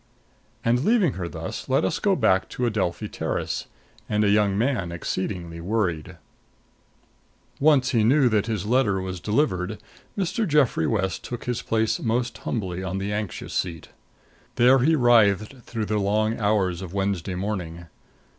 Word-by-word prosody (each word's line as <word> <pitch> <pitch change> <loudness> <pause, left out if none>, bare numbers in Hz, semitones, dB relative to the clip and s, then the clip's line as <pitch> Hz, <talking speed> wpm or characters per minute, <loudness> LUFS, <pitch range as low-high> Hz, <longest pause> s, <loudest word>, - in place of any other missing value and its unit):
And 120 +2 +2
leaving 210 - +3
her 90 -2 -4
thus, - - -6
let - - +2
us - - -1
go - - +2
back 95 0 +2
to 125 - -2
Adelphi 105 -3 -1
Terrace - - -3 0.4
and 105 0 +2
a 100 - +3
young 100 -1 +3
man 110 -7 0
exceedingly 85 -1 -4
worried. 90 -4 -2 1.4
Once 145 -3 +4
he 115 -5 +3
knew 130 +4 +4
that 110 -2 +1
his 105 -4 -2
letter 110 -4 +2
was 95 -1 -5
delivered, 105 - 0 0.4
Mr. 200 +3 0
Geoffrey 140 - +2
West 95 -5 -1
took 120 - -6
his 125 -1 -2
place 110 -1 0
most 120 +1 -1
humbly 95 -5 -3
on 95 0 -3
the 100 +1 -2
anxious 105 -3 -4
seat. 85 -4 -3 0.7
There 125 +3 +5
he 155 +6 +3
writhed 115 -2 +3
through 115 -3 -3
the 105 0 0
long 110 +3 0
hours 100 -4 +1
of 95 0 -7
Wednesday 95 -2 -1
morning. 90 -3 -4
105 Hz, 155 wpm, -24 LUFS, 95-120 Hz, 1.4 s, There